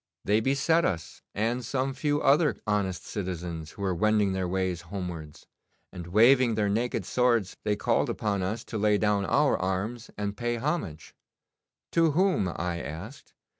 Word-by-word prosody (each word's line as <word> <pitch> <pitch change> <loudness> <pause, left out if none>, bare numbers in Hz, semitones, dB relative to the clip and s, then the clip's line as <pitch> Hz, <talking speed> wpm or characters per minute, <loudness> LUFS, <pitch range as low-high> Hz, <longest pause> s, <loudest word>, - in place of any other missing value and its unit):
'They 105 +2 +3
beset 140 +7 +2
us, 85 - -3
and 115 +4 0
some 135 +3 -1
few 145 +2 0
other 145 -1 +3
honest 95 -4 -1
citizens 85 -5 -5
who 100 - -7
were 95 -2 +1
wending 105 +1 +2
their 95 -1 -1
ways 90 -1 -1
homewards, 85 -6 -6 0.5
and 85 -2 -8
waving 115 +5 +5
their 105 -1 +1
naked 115 -1 -1
swords 120 -5 +1
they 105 -1 +1
called 100 - +1
upon 100 -3 -1
us 105 +5 -2
to 110 - -5
lay 105 0 +3
down 105 -1 +1
our 145 +7 +3
arms 100 +6 -2
and 105 0 -3
pay 120 +2 -1
homage. 115 - -3 0.8
"To 165 -3 +3
whom?" 180 - +2
I 85 0 -3
asked. 95 - -9
105 Hz, 160 wpm, -28 LUFS, 95-125 Hz, 0.8 s, waving